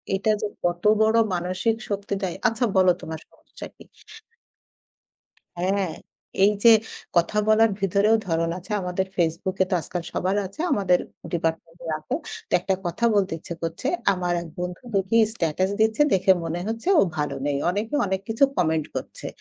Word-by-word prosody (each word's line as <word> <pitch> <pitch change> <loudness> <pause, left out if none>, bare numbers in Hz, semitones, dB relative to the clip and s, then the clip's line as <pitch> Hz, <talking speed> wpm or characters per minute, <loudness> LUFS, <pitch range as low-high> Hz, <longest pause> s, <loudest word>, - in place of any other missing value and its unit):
এটা 195 +3 -1
যে 210 - 0 0.2
কত 175 0 -1 0.2
বড় 220 +1 +4 0.2
মানসিক 185 +5 0
শক্তি 200 0 -3
দেয়। 180 - -2
"আচ্ছা 230 +1 0
বলো 185 -1 +6
তোমার 160 0 -6
সমস্যা - - -11
কি?" - - -14 1.7
হ্যাঁ, 190 +1 0 0.5
এই 205 - +6
যে 235 - +9 0.5
কথা 170 +5 +2
বলার 220 +1 +5
ভিতরেও 200 +3 +3
ধরণ 165 0 0
আছে। 185 +4 -11
আমাদের 180 +1 -1
Facebook 170 +3 0
এ - - -4
তো - - +2
আজকাল 175 - -4
সবার 190 +2 0
আছে। 195 +10 -11
আমাদের 180 -3 +3 0.3
ডিপার্টমেন্টে 165 0 -3
আছে। 155 0 -6 0.4
তো - - -5
একটা 190 +2 0
কথা 175 +7 -1
বলতে 195 -4 +2
ইচ্ছে 170 - -7
করছে। 165 +10 -3 0.3
আমার 180 -1 -1
এক 170 - -8
বন্ধু 180 +3 -5
দেখি 195 +4 +2 0.2
স্টেটাস 180 0 0
দিচ্ছে, 220 +3 +3
দেখে 190 0 +4
মনে 165 +1 -3
হচ্ছে 225 +8 -4
ও - - +7 0.2
ভালো 150 -1 -1
নেই। 145 -1 0
অনেকে 210 +9 -2
অনেক 190 0 -1
কিছু 225 +4 +1
কমেন্ট 160 -3 +1
করছে। - - -6
185 Hz, 165 wpm, -24 LUFS, 170-205 Hz, 1.7 s, যে